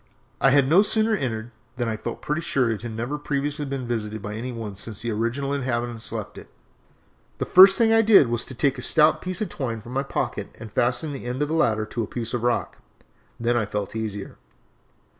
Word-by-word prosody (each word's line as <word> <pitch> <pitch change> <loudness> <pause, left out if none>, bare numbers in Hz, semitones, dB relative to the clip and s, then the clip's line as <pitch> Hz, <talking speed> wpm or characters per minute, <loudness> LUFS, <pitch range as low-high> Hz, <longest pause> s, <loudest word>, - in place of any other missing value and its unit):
I 135 - +6
had 135 0 +4
no 170 +7 +6
sooner 220 +1 +2
entered 120 - -2 0.3
than 120 -2 -1
I 110 - -1
felt 110 +2 -6
pretty 150 +3 -1
sure 130 -7 +1
it 105 -3 -3
had 120 -1 -6
never 120 +7 -3
previously 145 +1 -2
been 135 -2 -4
visited 110 -2 -3
by 105 +1 -6
any 120 +4 -5
one 110 -4 -6
since 105 +2 -5
the 120 - -2
original 120 +6 -1
inhabitants 120 -4 -3
left - - -6
it. - - -14 0.9
The - - -2
first 190 +1 +8
thing 225 -1 +4
I 225 - +6
did 210 - +6
was 120 -1 -1
to 130 - -7
take 135 +1 +1
a - - -5
stout 155 +4 +3
piece 185 +3 -4
of 215 - -1
twine 120 -5 -4
from 120 +4 -10
my 135 - +1
pocket 140 - -4
and 110 -2 -10
fasten 125 +5 +1
the 135 - -7
end 125 +4 -2
of 150 - -3
the - - -1
ladder 110 -9 +2
to 115 +2 -4
a 110 - -3
piece 115 +1 -4
of 120 - -1
rock. 120 0 -1 0.6
Then 120 +1 +1
I 115 -4 0
felt 105 0 -4
easier. 105 -3 -5
120 Hz, 225 wpm, -24 LUFS, 115-145 Hz, 0.9 s, first